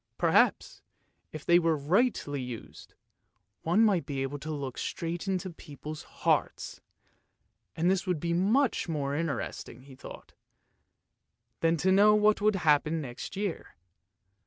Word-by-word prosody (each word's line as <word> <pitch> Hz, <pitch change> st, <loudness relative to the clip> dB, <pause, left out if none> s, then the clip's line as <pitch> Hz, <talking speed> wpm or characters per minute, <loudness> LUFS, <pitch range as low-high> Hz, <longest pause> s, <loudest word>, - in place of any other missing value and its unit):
Perhaps, -, -, +2 dB, 0.5 s
if 155 Hz, -1 st, -8 dB
they 175 Hz, 0 st, +5 dB
were 165 Hz, -2 st, +1 dB
rightly 150 Hz, -, 0 dB
used, 125 Hz, -3 st, -9 dB, 0.7 s
one 180 Hz, +8 st, +3 dB
might 195 Hz, -6 st, +2 dB
be 135 Hz, -2 st, -3 dB
able 140 Hz, +2 st, -4 dB
to 155 Hz, -, -7 dB
look 140 Hz, -4 st, -5 dB
straight 170 Hz, +2 st, -4 dB
into 185 Hz, -1 st, -2 dB
people's 150 Hz, -1 st, -9 dB
hearts, -, -, -2 dB, 0.9 s
and 165 Hz, +2 st, 0 dB
this 190 Hz, 0 st, +1 dB
would 180 Hz, -4 st, 0 dB
be 170 Hz, +2 st, -1 dB
much 210 Hz, +5 st, +1 dB
more 140 Hz, -3 st, -2 dB
interesting, 140 Hz, -5 st, -4 dB
he 135 Hz, 0 st, -14 dB
thought, 130 Hz, -, -12 dB, 1.3 s
than 165 Hz, 0 st, +2 dB
to 190 Hz, +4 st, +2 dB
know 205 Hz, +2 st, +6 dB
what 210 Hz, 0 st, +3 dB
would 215 Hz, 0 st, +3 dB
happen 155 Hz, -2 st, +2 dB
next 130 Hz, +4 st, -7 dB
year. 200 Hz, -3 st, -4 dB
165 Hz, 135 wpm, -29 LUFS, 145-190 Hz, 1.3 s, know